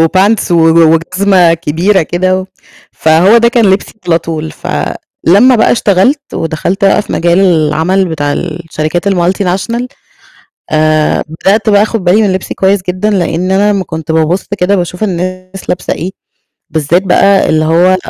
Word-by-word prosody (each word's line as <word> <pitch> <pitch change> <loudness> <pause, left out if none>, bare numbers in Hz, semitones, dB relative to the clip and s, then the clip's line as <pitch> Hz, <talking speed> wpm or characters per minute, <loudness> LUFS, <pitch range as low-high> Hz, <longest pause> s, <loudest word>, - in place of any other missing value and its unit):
وpants 190 +6 +1
و 165 -2 +3
و 165 0 +4
وجزمة 180 +1 +2
كبيرة 170 +4 0
كده 185 +3 -1
و 185 - -8 0.5
فهو 165 +7 +3
ده 235 0 +3
كان 235 -2 +1
لبسي 190 +1 0
على 165 -1 +2
طول. 160 -1 -5
فلمّا 240 +9 0
بقى 220 - +3
اشتغلت 240 +7 0
ودخلت 170 +5 -2
بقى 195 - +3
في - - -8
مجال 170 +1 +1
العمل 180 +1 +1
بتاع 145 -3 -2
الشركات 165 +2 -3
الmultinational، 190 +6 -1 0.9
آآ 155 0 +1
بدأت 205 +7 0
بقى 205 -1 +4
آخد 220 -2 -3
بالي 185 +5 +3
من 200 -3 +1
لِبسي 190 - -4
كويس 195 0 +1
جدًا 185 +4 -1
لأن 185 -2 -1
أنا 205 +2 +2
أمّا 195 -2 -1
كنت 160 -2 -6
بابُص 160 +3 0
كده 185 +3 +2
باشوف 180 +1 -3
الناس 185 0 -5
لابسة 180 - -2
إيه، 180 +4 -5 0.6
بالذات 160 +3 0
بقى 195 +1 +2
اللي 155 0 +1
هو 175 +4 +3
180 Hz, 155 wpm, -10 LUFS, 165-195 Hz, 0.9 s, و